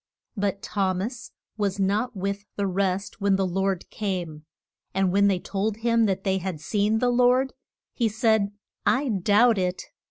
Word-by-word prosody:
But 200 -1 -2
Thom 190 -3 0
as 235 +2 -6 0.3
was 200 -2 -1
not 210 +5 0
with 200 +2 -3
the 200 - -1
rest 195 +1 -1
when 200 -1 +3
the 190 0 +1
Lord 190 0 -1
came. 175 -7 -4 0.5
And 190 -1 +2
when 200 +2 +4
they 195 -2 +2
told 200 +3 -2
him 230 -1 +2
that 190 -2 -1
they 190 -1 +1
had 185 -4 -4
seen 210 +6 +1
the 245 +2 +2
Lord, 250 +2 +3 0.4
he 235 -3 +1
said, 220 -2 +2 0.3
I 270 +1 +2
doubt 210 +2 +4
it. 180 0 -1
200 Hz, 165 wpm, -25 LUFS, 190-220 Hz, 0.5 s, when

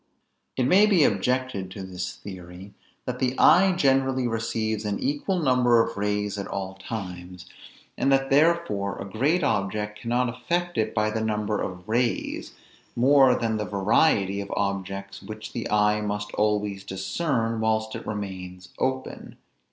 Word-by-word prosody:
It 130 - +2
may 190 +11 +5
be 190 -7 +4
objected 115 -2 0
to 95 +1 -8
this 95 0 -5
theory, 95 0 -10 0.3
that 125 0 -4
the 130 0 0
eye 190 +1 +6
generally 135 -5 +2
receives 110 -1 -2
an 105 -1 -1
equal 145 +8 -1
number 125 -6 +3
of - - -5
rays 105 0 -1
at 100 - -4
all 95 -1 -4
times, 90 -3 -7 0.5
and 135 - +2
that 135 0 +2
therefore 145 - +2
a - - -6
great 140 - +1
object 105 -1 -1
cannot 120 +3 0
affect 170 +9 -2
it 110 0 -1
by 105 0 +1
the 110 0 -2
number 105 -1 -1
of 90 +1 -6
rays, 120 +2 -1 0.4
more 135 +1 +5
than 110 -2 -1
that 105 -3 -4
variety 100 - +2
of 100 - -7
objects 100 0 -3
which 110 0 -8
the 115 - -4
eye 105 0 +3
must 105 +1 -3
always 105 -2 0
discern 115 - -2
whilst 110 0 0
it - - -7
remains 90 -3 -6
open. 130 0 -3
110 Hz, 150 wpm, -25 LUFS, 100-130 Hz, 0.5 s, eye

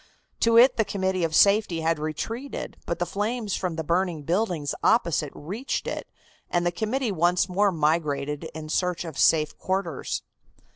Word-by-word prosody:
To 230 0 +4
it 250 +3 +7
the 220 - +4
Committee 190 -3 -1
of 160 -1 0
Safety 200 -4 +4
had 160 -1 +1
retreated, 225 - -4
but 170 - -1
the 175 - -1
flames 210 +3 -2
from 180 -3 -2
the 160 - -3
burning 170 -1 0
buildings 170 -4 -1
opposite 170 - +2
reached 205 - -4
it, - - -4 0.4
and 175 0 +1
the 175 - +2
committee 220 +6 -1
once 175 +1 +2
more 200 +2 +2
migrated 150 -2 0
in 155 -1 -6
search 180 +2 -1
of 160 -4 -7
safe 155 -2 +3
quarters. 185 -6 -2
175 Hz, 160 wpm, -25 LUFS, 160-205 Hz, 0.4 s, it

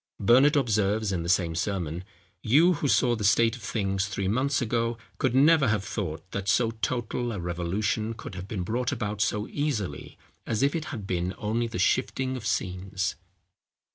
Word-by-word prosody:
Burnet 130 +8 +5
observes 110 -5 +1
in 90 -3 -1
the 85 - -4
same 85 -2 +2
sermon, 85 -1 -2 0.4
"You 160 +10 +5
who 145 -2 -1
saw 125 -2 +3
the 110 - -5
state 115 +3 +4
of 125 - -12
things 95 -2 -1
three 100 -1 -3
months 130 +7 +1
ago, 115 -1 -1 0.2
could 130 -4 +1
never 150 +1 +5
have 105 -3 +1
thought 95 -6 -5
that 100 0 -3
so 115 +1 +3
total 120 +2 -2
a 100 - -4
revolution 95 +6 -2
could 105 - -9
have 90 +1 -7
been 100 -4 -3
brought 125 +7 -1
about 105 -5 -3
so 105 -1 0
easily 145 -10 -3 0.3
as 110 +3 0
if 140 - +3
it 160 -2 -2
had 110 -9 -6
been 90 0 -2
only 115 +2 -1
the 115 - -5
shifting 130 +6 +1
of 115 -3 -5
scenes. 95 -2 -2
110 Hz, 180 wpm, -27 LUFS, 95-125 Hz, 0.4 s, Burnet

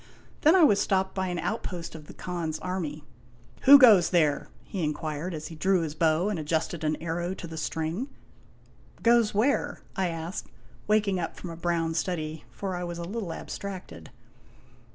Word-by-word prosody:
Then 315 +4 +6
I 365 - +6
was 205 -9 +5
stopped 190 -1 +1
by 190 -1 -1
an 180 -1 -2
outpost 180 -3 -4
of 155 -2 -10
the - - -12
Khan's 170 -3 -3
army. 165 -5 -4 0.6
"Who 285 +2 +11
goes 215 -10 +7
there?' 155 -5 +2 0.2
he 190 -5 -4
inquired, 155 +3 -3
as 155 0 -6
he 165 - -9
drew 185 +3 +2
his 155 -2 -3
bow 160 +3 +2
and 210 -5 -1
ad 150 - -6
justed 160 0 -1
an 155 0 +1
arrow 170 +3 -3
to - - -8
the 165 -1 -8
string. 160 - -3 0.5
" - - -26
Goes 235 -3 +4
where? 280 +6 +1
" - - -29
I 190 -1 +1
asked, 165 +1 -5 0.4
waking 210 -3 +2
up 165 - -3
from 175 - -7
a - - -7
brown 165 -1 0
study, 160 -3 -3
for 190 -2 -4
I 180 - -3
was 175 -1 -4
a 170 - -5
little 195 0 -4
abstracted. 170 - -7
175 Hz, 190 wpm, -27 LUFS, 160-195 Hz, 0.6 s, Who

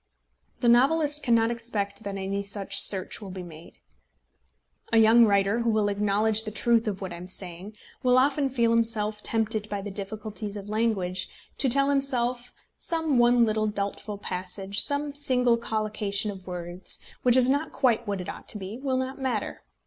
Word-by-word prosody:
The 245 - +1
novelist 295 +5 +4
cannot 230 -2 +2
expect 220 -3 -3
that 200 -1 -4
any 195 +1 -3
such 200 0 +1
search 190 +2 +2
will 200 - -8
be 185 -1 -7
made. 165 -1 -12 1.2
A 225 - +3
young 225 +1 +6
writer, 200 +2 +2
who 235 0 0
will 215 -2 +1
acknowledge 210 +2 +2
the 215 - -4
truth 230 +2 +1
of 200 -2 -3
what 185 -2 -5
I - - -7
am 180 +1 -9
saying, 185 +2 -6 0.3
will 250 0 +3
often 275 +1 +2
feel 235 -3 +1
himself 220 -2 0
tempted 220 -1 0
by 200 -1 -4
the 205 - -6
difficulties 210 +1 -3
of 200 0 -9
language 210 -5 -1 0.3
to 265 - +2
tell 275 +3 +3
himself 250 -3 -1
that - - -23 0.3
some 320 -6 0
one 240 0 +5
little 215 0 0
doubtful 205 0 -4
passage, 190 +1 -2
some 285 0 0
single 250 -4 +2
collocation 215 -2 -1
of 190 -2 -12
words, 175 0 -4 0.2
which 250 0 +4
is 250 -1 +6
not 285 +4 0
quite 235 -4 +1
what 200 -1 -2
it 180 - -6
ought - - -8
to 215 - -4
be, 200 +4 -7
will 265 -1 -1
not 260 +1 -4
matter. 245 -6 -2
215 Hz, 180 wpm, -26 LUFS, 200-245 Hz, 1.2 s, young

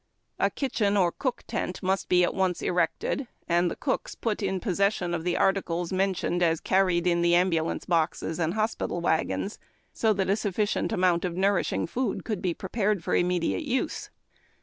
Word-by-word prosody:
A - - +3
kitchen 215 -7 0
or 180 -3 +3
cook 255 +5 -3
tent 180 - -4
must 190 +1 0
be 180 0 +5
at - - +1
once 185 -2 0
erected 180 +9 0 0.2
and 175 0 +2
the - - -5
cooks 265 - -2
put 220 -2 -2
in 190 -1 -1
possession 195 -2 0
of 165 -1 -2
the 175 0 0
articles 180 -3 0
mentioned 185 -2 0
as 165 -2 +3
carried 185 -2 +2
in 170 -1 +2
the 170 0 +4
ambulance 170 -3 +1
boxes 165 -1 0
and 165 +3 0
hospital 215 -5 -1
wagons, 170 +4 -1 0.3
so 220 - +2
that 195 -1 -1
a 195 - +3
sufficient 205 0 -1
amount 180 -2 +2
of 180 -1 -3
nourishing 195 0 +1
food 250 +9 -2
could 215 -5 -3
be 175 -3 -1
prepared 200 -1 -1
for - - 0
immediate 175 - +1
use. 260 -2 -2
185 Hz, 175 wpm, -27 LUFS, 175-200 Hz, 0.3 s, be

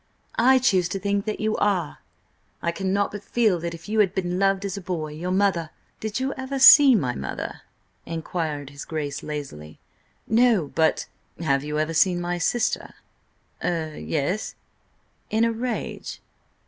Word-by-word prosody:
"I 260 +3 +6
choose 190 -9 +2
to 195 - -3
think 200 +1 -1
that 215 - -3
you 215 0 0
are. 185 -7 0 0.6
I 170 - -1
cannot 195 +3 -1
but 205 0 -7
feel 215 -4 +1
that 170 0 -4
if 165 - -13
you 215 +1 0
had 195 -3 +3
been 180 -1 -1
loved 195 0 +2
as 195 - -3
a 200 - -6
boy— 170 -4 -4
Your 165 +4 -5
mother—" 185 -4 +1 0.3
"Did 220 +2 -3
you 265 +1 -1
ever 265 +1 -4
see 270 0 +9
my 130 - 0
mother?" 65 -1 -5 0.5
inquired 160 -3 -4
his 140 0 -8
Grace 150 -3 -4
lazily. 135 - -7 0.5
"No–but—" 210 - +2 0.4
"Have 140 -4 +1
you 150 0 -3
ever 155 +1 0
seen 175 +2 +3
my 175 0 -2
sister?" 240 +7 -1 0.7
"Er–yes—" 160 +2 -2 0.7
"In 220 +1 +2
a 230 - +1
rage?" 235 +1 -4
180 Hz, 155 wpm, -24 LUFS, 160-215 Hz, 0.7 s, see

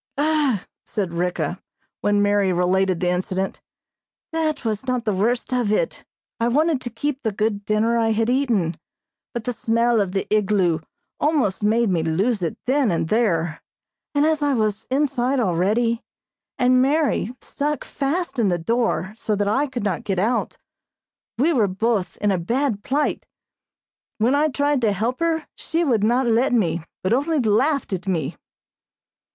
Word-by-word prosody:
"Ugh!" 290 -7 +2 0.2
said 190 -5 -3
Ricka, 175 0 -2 0.4
when 205 0 +2
Mary 205 -2 +2
related 185 0 +1
the 180 - +1
incident, 185 +1 -2 0.7
"that 310 -4 -1
was 220 +3 -2
not 250 -2 -1
the 210 - +1
worst 235 +6 0
of 245 -4 +1
it. 480 - -1 0.3
I 230 - +2
wanted 295 +3 +2
to 245 - -4
keep 270 +4 -3
the 220 - -1
good 210 0 -1
dinner 220 +2 +2
I 225 -1 +2
had 225 0 +1
eaten, 240 -10 +1 0.5
but 235 -3 -4
the 245 - -2
smell 230 0 +2
of 190 -2 -2
the 195 - -1
igloo 190 -6 +2 0.4
almost 285 -11 +1
made 220 +1 +2
me 170 -3 +1
lose 190 +8 0
it 165 - -2
then 265 -1 +2
and 165 -1 -1
there, 170 -8 +1 0.5
and 285 +1 +4
as 315 -1 +1
I 290 -2 +2
was 215 -1 -1
inside 265 -1 +1
already, 225 +4 +1 0.6
and 255 0 +4
Mary 275 -4 +1
stuck 295 +1 -3
fast 290 0 -2
in 220 - +3
the 175 -2 +1
door 215 +1 0
so 220 -1 -1
I 215 +8 +1
could 260 -5 -5
not 205 +2 -1
get 195 -3 -2
out, 230 +6 0 0.8
we 310 +8 +3
were 225 -7 +3
both 195 -2 -1
in 205 -1 +1
a 185 - +1
bad 230 +3 -1
plight. 290 +3 -1 0.9
When 230 +4 +2
I 295 +2 +3
tried 285 -1 0
to 215 -3 +2
help 230 +6 -2
her 330 -2 0
she 330 +1 -1
would 235 -9 +2
not 245 +4 +2
let 240 +3 +2
me, 175 -8 +1 0.2
but 185 - +2
only 300 +5 +1
laughed 260 +2 +1
at 185 0 -4
me." 165 -7 -1
225 Hz, 165 wpm, -22 LUFS, 195-265 Hz, 0.9 s, and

